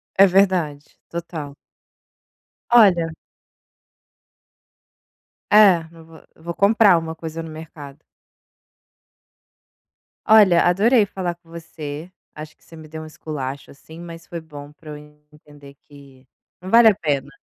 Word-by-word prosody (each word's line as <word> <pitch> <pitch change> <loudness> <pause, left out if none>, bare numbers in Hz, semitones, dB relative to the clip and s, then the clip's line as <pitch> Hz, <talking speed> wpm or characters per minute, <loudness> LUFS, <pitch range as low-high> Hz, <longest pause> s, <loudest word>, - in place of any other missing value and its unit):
É 195 - +7
verdade, 180 -6 0 0.2
total. 160 -4 -7 1.2
Olha 195 -8 +5 2.4
É, 195 -6 +5
não 165 -1 -16
vou 165 0 -17
vou 170 +2 -8
comprar 200 -1 +4
uma 160 0 -5
coisa 160 0 -7
no 165 - -9
mercado. 155 -2 -12 2.3
Olha, 205 -6 +5
adorei 210 +5 +3
falar 180 -3 -5
com 170 -1 -28
você. 160 0 -9 0.2
Acho 155 0 -10
que - - -33
você 165 - -16
me 155 -1 -13
deu 160 +1 -9
um 155 - -9
esculacho 145 -3 -8
assim, 160 +4 -15
mas 165 -1 -11
foi 170 - -7
bom 145 -2 -12
para 155 0 -13
eu 150 - -8 0.3
entender 145 -2 -17
que 140 -3 -18 0.3
não 185 - -9
vale 230 +1 +6
a 205 - 0
pena. 145 -7 -3
165 Hz, 125 wpm, -20 LUFS, 150-180 Hz, 2.4 s, É